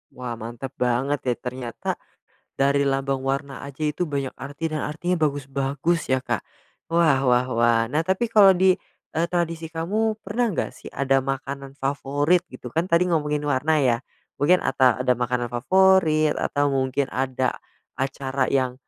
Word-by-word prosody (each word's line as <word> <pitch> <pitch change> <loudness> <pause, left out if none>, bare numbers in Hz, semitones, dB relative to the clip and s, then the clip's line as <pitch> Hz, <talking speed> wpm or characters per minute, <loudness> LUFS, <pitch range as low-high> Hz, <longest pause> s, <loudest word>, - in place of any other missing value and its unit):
Wah 125 -1 -5
mantap 120 +4 -6
banget 130 +3 0
ya 125 -2 0
ternyata, 125 -1 -7 0.7
dari 140 +1 +2
lambang 135 0 0
warna 135 0 -3
aja 140 +2 -9
itu 150 +3 0
banyak 140 -3 -2
arti 145 +5 -4
dan 155 -1 -2
artinya 175 +4 -1
bagus-bagus 140 +3 -1
ya, 130 0 +1
Kak. - - -2 0.5
Wah 165 -5 +4
wah 125 0 +3
wah, 115 -1 +3
nah 155 +3 +1
tapi 190 +5 +1
kalau 205 -3 +7
di, 185 +1 +4 0.4
eee, 165 +2 +1
tradisi 170 -2 -1
kamu, 210 +7 -1
pernah 235 +2 0
nggak - - -1
sih - - -11
ada 135 -1 +2
makanan 135 0 -5
favorit 145 +5 +1
gitu 130 -1 -11
kan 165 +7 0
tadi 170 +2 +4
ngomongin 150 -2 0
warna 145 +3 +2
ya, 125 -5 +2 0.4
mungkin 165 +6 +4
ata 130 -2 +3
ada 125 0 +3
makanan 125 0 -1
favorit 160 +2 +3
atau 145 0 0
mungkin 135 0 0
ada, 130 -1 0 0.4
acara 135 0 -2
yang, 130 -2 +1
140 Hz, 155 wpm, -24 LUFS, 130-165 Hz, 0.7 s, kalau